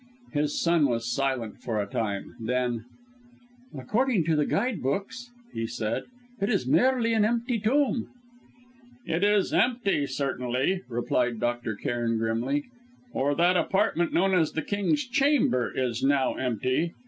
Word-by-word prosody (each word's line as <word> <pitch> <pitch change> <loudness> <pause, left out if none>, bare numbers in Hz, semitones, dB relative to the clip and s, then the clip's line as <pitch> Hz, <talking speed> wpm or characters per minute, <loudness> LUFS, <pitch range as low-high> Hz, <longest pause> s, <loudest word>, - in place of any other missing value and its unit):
His 150 0 0
son 170 -4 +3
was 115 -2 -1
silent 130 -5 -2
for 110 -3 -2
a 100 - 0
time; 100 -3 -3
then: 120 0 -1 0.9
"According 215 - +1
to 160 0 +1
the 150 -1 +1
guide 240 -8 0
books," 205 - -3 0.2
he 115 0 -2
said, 110 -1 -3 0.4
"it 200 - +1
is 200 - +1
merely 235 - +3
an 220 -2 +3
empty 235 +2 0
tomb." 255 +3 +1 1.0
"It 165 +4 -1
is 205 -1 +3
empty, 215 - +2
certainly," 130 +5 -1
replied 120 0 0
Dr. 120 -2 -1
Cairn 115 +1 -1
grimly, 115 +6 0 0.5
"or 145 +2 +1
that 175 +3 +3
apartment 180 -1 +1
known 190 +2 +2
as 165 -4 +2
the 160 - -2
King's 210 +9 0
Chamber 250 - +2
is 125 -2 -2
now 135 -1 +2
empty. 130 +6 -1
145 Hz, 140 wpm, -27 LUFS, -, 1.0 s, son